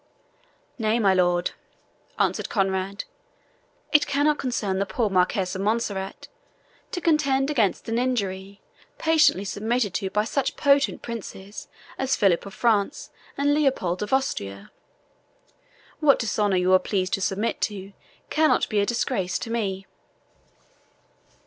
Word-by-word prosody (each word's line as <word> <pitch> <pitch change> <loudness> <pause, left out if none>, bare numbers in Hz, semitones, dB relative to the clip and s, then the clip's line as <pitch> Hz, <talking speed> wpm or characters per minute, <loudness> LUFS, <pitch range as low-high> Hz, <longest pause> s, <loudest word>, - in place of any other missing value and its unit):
"Nay, 220 0 +1
my 200 -5 +3
lord," 175 -1 +2 0.7
answered - - 0
Conrade, 195 -1 -1 0.9
"it 300 -1 +4
cannot 290 +1 +2
concern 210 -7 -1
the 200 - -1
poor 220 -2 -1
Marquis 185 +1 +2
of 185 0 -4
Montserrat 200 -2 -2 0.6
to 355 - -3
contend 285 -4 +2
against 225 -9 0
an 225 +1 0
injury 200 -6 -2 0.4
patiently 300 -10 +3
submitted 215 +1 -1
to 195 -3 -2
by 210 +2 +1
such 265 +4 -1
potent 280 -1 +2
princes 210 -3 -7 0.3
as 265 0 +1
Philip 195 -1 +2
of 195 - -10
France 225 +2 0 0.3
and 285 +1 +2
Leopold 265 - +1
of 210 - -4
Austria. 100 - -2 1.3
What 295 -3 +5
dishonour 210 -4 0
you 180 +1 +3
are 185 - +7
pleased 185 -1 -2
to 195 - 0
submit 200 +4 -1
to 200 -2 -3 0.4
cannot 310 0 +3
be 215 - +1
a 200 - +1
disgrace 190 -6 -1
to 230 - -6
me." 195 -4 -2
210 Hz, 130 wpm, -24 LUFS, 190-265 Hz, 1.3 s, are